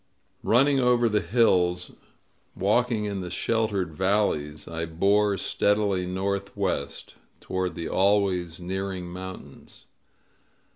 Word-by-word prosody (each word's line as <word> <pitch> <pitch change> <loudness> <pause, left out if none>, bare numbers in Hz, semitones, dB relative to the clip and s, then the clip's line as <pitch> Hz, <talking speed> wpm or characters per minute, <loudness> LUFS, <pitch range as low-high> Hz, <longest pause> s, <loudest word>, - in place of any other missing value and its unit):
Running 135 +4 +3
over 125 -1 +3
the 105 -1 +2
hills, 90 -3 +2 0.6
walking 110 +2 +1
in 100 -2 -3
the 90 - -5
sheltered 105 -5 -1
valleys, 80 -5 0
I 85 0 -3
bore 100 +5 +2
steadily 100 -2 +1
northwest, 100 -3 -3 0.3
toward 95 -1 -3
the 85 - -4
always 95 -4 +1
nearing 95 0 -4
mountains. 95 +1 -10
95 Hz, 100 wpm, -26 LUFS, 90-105 Hz, 0.6 s, Running